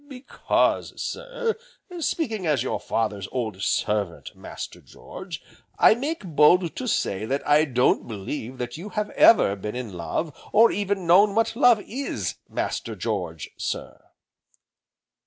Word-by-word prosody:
"Because, 260 -1 -1
sir, - - -3 0.4
speaking 225 - -2
as 145 -6 +2
your - - -2
father's 105 -4 -2
old 110 -7 -3
servant, 100 -4 -1
Master - - -8
George, - - -10 0.3
I - - +7
make 280 +2 -4
bold 165 +2 +4
to 255 - -4
say 105 - 0
that 135 +5 -2
I 150 +1 +5
don't 125 -3 +2
believe 115 +4 -6
that 120 +1 -5
you 190 +6 -7
have 210 0 -3
ever 100 - +6
been 105 +3 -6
in 125 -5 -5
love, 90 - -3 0.2
or 225 +2 +6
even 200 -2 -2
know 180 +5 +7
what 225 +2 0
love 240 -4 +5
is, 220 - -3 0.2
Master 115 - -3
George, 90 -7 -4
sir." - - -5
150 Hz, 140 wpm, -24 LUFS, -, 0.4 s, I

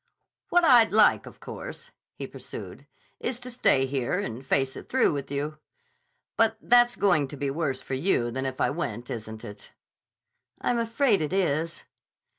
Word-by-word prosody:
"What 350 0 +4
I'd 240 -7 +6
like, 215 +1 +4
of - - -13
course," - - -8 0.2
he - - -5
pursued, - - -8 0.3
"is 245 -1 -3
to 250 +1 -7
stay 135 - +3
here 135 +4 -1
and 130 - -4
face 135 0 0
it - - -10
through 260 -9 +3
with 140 -2 -4
you. 145 +2 -3 0.8
But 225 -1 +3
that's 240 +1 +4
going 175 -8 +2
to 145 - -9
be 140 0 -2
worse 140 -3 -2
for - - -6
you 130 -5 +1
than 130 +2 -2
if 130 0 -6
I - - +2
went, 120 -7 -4
isn't 110 -1 -7
it?" 105 0 -11 0.9
"I'm 240 - 0
afraid 230 - +2
it 155 +3 -2
is." 165 -3 0
155 Hz, 170 wpm, -27 LUFS, 130-225 Hz, 0.9 s, I'd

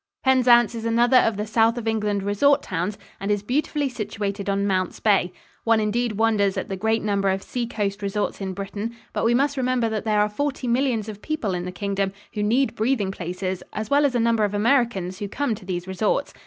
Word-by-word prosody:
Penzance 245 -4 +5
is 230 -1 -5
another 235 +2 +4
of 225 -3 +1
the 210 - -2
South 225 +2 +2
of 230 -2 -4
England 210 -3 0
resort 275 +9 +3
towns 180 +3 -3 0.2
and 195 - -4
is 205 -1 +1
beautifully 285 +4 0
situated 205 -4 -4
on 200 0 +1
Mounts 185 -2 -1
Bay. 195 -4 +2 0.3
One 225 -1 +3
indeed 220 +2 0
wonders 210 -2 +2
at - - -3
the 195 - -2
great 220 +3 0
number 200 -2 +1
of 190 0 -1
seacoast 215 -4 -3
resorts 200 +1 -2
in 190 -1 -3
Britain, 205 +4 -5 0.2
but - - -1
we 235 +1 +3
must 280 +2 +1
remember 255 -3 +1
that 220 -1 -2
there 215 -1 +1
are 210 - +3
forty 275 +4 -3
millions 240 -3 +1
of 210 -1 -8
people 310 -10 -2
in 175 0 -3
the 180 - -4
Kingdom 195 +1 -2 0.2
who 210 - -2
need 240 +6 +2
breathing 220 -3 0
places 185 0 -4
as 215 +4 -4
well 285 +1 +5
as 275 -3 +2
a - - +2
number 230 -1 +2
of 205 0 0
Americans 205 -5 +1
who 205 - -3
come 285 +1 -1
to 205 -3 -9
these 180 -1 -3
resorts. 190 +3 -1
215 Hz, 215 wpm, -23 LUFS, 200-240 Hz, 0.3 s, Penzance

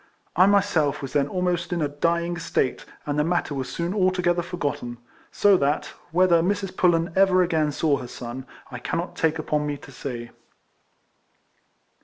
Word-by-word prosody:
I 185 +3 +6
myself 190 -9 +2
was 135 - -6
then 140 -1 +2
almost 180 +1 -1
in 175 - 0
a 150 - +1
dying 170 +4 0
state, 160 -5 -1 0.2
and 145 0 -1
the - - +3
matter 170 -2 0
was 130 -2 -3
soon 170 +2 -2
altogether 185 -3 +2
forgot 170 -5 -2
ten. 120 0 -7 0.3
So 200 -2 +4
that, 145 -1 0 0.2
whether 175 -1 +4
Mrs. 195 +1 -1
Pullen 170 -3 +2
ever 190 -1 +5
again 160 -4 +1
saw 145 -1 +1
her 125 - -7
son, 125 +2 -7 0.2
I 125 - -6
cannot 170 +8 -3
take 160 0 +1
upon 150 -1 -1
me 145 -1 -2
to 140 - -14
say. 120 -3 -6
165 Hz, 170 wpm, -24 LUFS, 145-180 Hz, 0.3 s, I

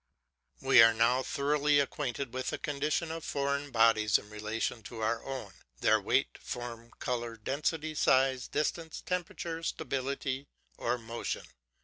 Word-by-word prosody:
We 135 -3 +7
are 115 0 +7
now 120 +3 +3
thoroughly 145 +2 +2
acquainted 140 -2 -2
with 130 0 -2
the - - -2
condition 150 +3 -1
of 165 -1 -5
foreign 140 0 -1
bodies 115 -4 +4
in 105 - -12
relation 110 +2 -2
to 110 +2 -8
our 115 +1 0
own, 130 -8 -6 0.3
their - - +4
weight, - - +1
form, 120 -1 -6
colour, 120 -2 -3
density, 150 +7 -2
size, 130 -3 +3
distance, 160 +2 -2
temperature, 170 -2 -3
stability, 135 -2 -2 0.3
or 125 +1 -1
motion. 115 0 -4
130 Hz, 135 wpm, -31 LUFS, 115-145 Hz, 0.3 s, We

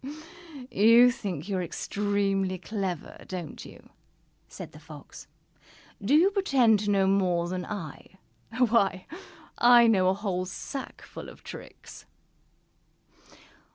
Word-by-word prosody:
"You 230 +4 +6
think 190 - -5
you 195 -2 -1
are - - -1
extremely 195 +1 -1
clever, 185 -3 -5
don't 175 -5 -7
you?" - - -15 0.6
said - - -10
the 150 - -14
Fox. 150 -2 -12 0.8
"Do 260 +9 +3
you 360 +6 +5
pretend 265 - +3
to 205 0 -2
know 195 -1 +3
more 185 -3 +1
than 180 0 -4
I? 190 -3 -8 0.4
Why, 220 -6 +2 0.5
I 240 0 +7
know 190 -5 +4
a 190 - +1
whole 190 -3 -3
sackful 265 +8 -8
of - - -15
tricks!" - - -11
195 Hz, 120 wpm, -27 LUFS, 185-230 Hz, 0.8 s, I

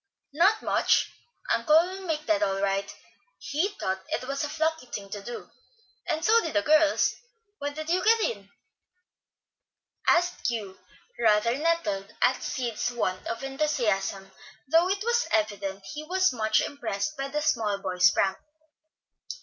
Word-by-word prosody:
"Not 380 +8 +3
much. - - +2 0.4
Uncle 310 -1 +4
will 370 +2 -3
make 305 -2 -2
that 320 -1 +2
all 195 -1 0
right. 195 0 -1 0.5
He 310 +7 -1
thought 190 0 -2
it 255 - -3
was 275 +1 -2
a - - -1
plucky 320 -3 -1
thing 200 -4 -7
to 205 - -5
do, 240 +4 -8 0.6
and 320 -1 -1
so 460 +2 +5
did 325 - -5
the 310 - +3
girls. 310 0 +4 0.5
When 285 0 -4
did 310 0 -6
you 360 +2 +1
get 455 +1 +5
in?" 200 - -2 1.6
asked 350 +1 +2
Hugh, 210 -5 -5 0.4
rather 225 +1 +3
nettled 260 -11 -1
at 260 - +2
Sid's 240 -2 -2
want 185 -6 -2
of 230 +3 -4
enthusiasm, 225 -9 -1 0.4
though 330 +5 +4
it 395 +1 -1
was 475 +1 +1
evident 200 -2 -1
he 300 0 -6
was 370 0 +2
much 220 -2 +2
impressed 280 0 -3
by 275 -1 -3
the 295 +2 -2
"small 220 -9 +1
boy's" 180 -3 +3
prank. 190 +4 0
270 Hz, 150 wpm, -27 LUFS, 205-320 Hz, 1.6 s, so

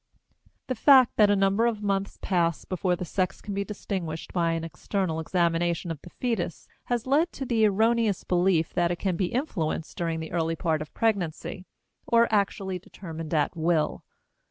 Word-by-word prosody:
The 255 - -2
fact 260 +1 +6
that 210 -2 +6
a 205 - +4
number 195 +4 +3
of 215 -3 -2
months 195 -1 -1
pass 170 -4 +1
before 185 -1 0
the 180 - -5
sex 185 +2 -1
can 205 - -6
be 200 0 -1
distinguished 185 -5 -5
by 170 -2 +1
an 165 0 -2
external 165 0 -2
examination 170 0 0
of 155 -3 -6
the - - -12
fetus 200 -8 -3 0.2
has 240 -2 -1
led 295 +6 +2
to 270 - -5
the 225 -3 +3
erroneous 220 0 +2
belief 175 -2 +2
that 175 -1 +2
it 175 - -1
can 185 0 -1
be 180 +1 0
influenced 175 - -2
during 165 -1 -2
the 160 0 -6
early 165 -1 0
part 160 -2 0
of 155 - -7
pregnancy 185 -4 -1 0.4
or 235 0 +5
actually 195 -2 0
determined 165 -3 -8
at 150 +3 +1
will. 165 -1 0
185 Hz, 180 wpm, -27 LUFS, 165-210 Hz, 0.4 s, fact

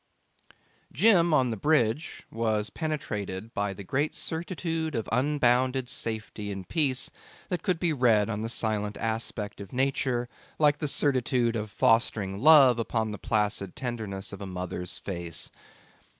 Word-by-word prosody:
Jim 175 - +4
on 130 -5 +3
the - - -2
bridge 145 +2 +1
was 110 -2 -1
penetrated 110 - -4
by 100 0 -1
the 95 +1 -8
great 140 +10 -1
certitude 165 -2 -3
of 115 - -2
unbounded 130 0 +2
safety 110 -4 -4
and 95 -2 -6
peace 140 -6 +2 0.4
that 180 - -2
could 185 -4 0
be 170 -3 +1
read 115 -6 +3
on 110 -2 -3
the 115 - -3
silent 105 -3 -1
aspect 110 -2 -3
of 100 - -10
nature 130 -2 0 0.3
like 150 -1 +3
the 150 - -1
certitude 130 -4 +1
of 110 -1 -3
fostering 105 -3 +1
love 135 -3 +7
upon 110 -1 -1
the 105 - -6
placid 105 -3 -1
tenderness 110 -7 -5
of 100 - -8
a 100 - -5
mother's 90 -1 -5
face. 85 -4 -3
115 Hz, 145 wpm, -28 LUFS, 105-145 Hz, 0.4 s, love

